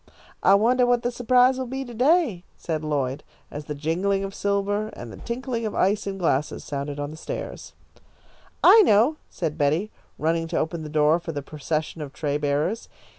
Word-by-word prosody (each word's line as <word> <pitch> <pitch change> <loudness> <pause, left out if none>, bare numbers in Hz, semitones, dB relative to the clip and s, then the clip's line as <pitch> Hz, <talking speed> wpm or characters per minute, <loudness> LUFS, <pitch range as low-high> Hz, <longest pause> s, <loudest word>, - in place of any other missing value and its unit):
"I 195 - +6
wonder 245 +4 +3
what 245 -1 +2
the 245 - 0
surprise 250 +2 +3
will 260 - -3
be 265 +2 -4
to 240 - -9
day," 255 - +2
said 160 -2 -3
Lloyd, 140 -2 -2 0.3
as 145 +1 -7
the 150 - -5
jingling 180 +7 0
of 195 0 -5
silver 200 +1 0
and 115 - -9
tinkling 235 0 -3
of 215 - -3
ice 200 +2 +1
in 195 -1 -3
glasses 150 -5 0
sounded 140 0 -4
on 145 +1 -3
the 155 - -10
stairs. - - -6 0.9
"I 445 - +9
know," 250 - +4
said 160 -2 -4
Betty, 155 +9 +1 0.3
running 165 +1 0
to 165 - -2
open 160 +1 -2
the 155 - -6
door 155 +2 +3
for 165 - -6
the 145 -1 -4
procession 155 +2 -3
of 140 -2 -7
tray 145 -2 -2
bearers. 150 +9 -1
175 Hz, 185 wpm, -24 LUFS, 150-230 Hz, 0.9 s, I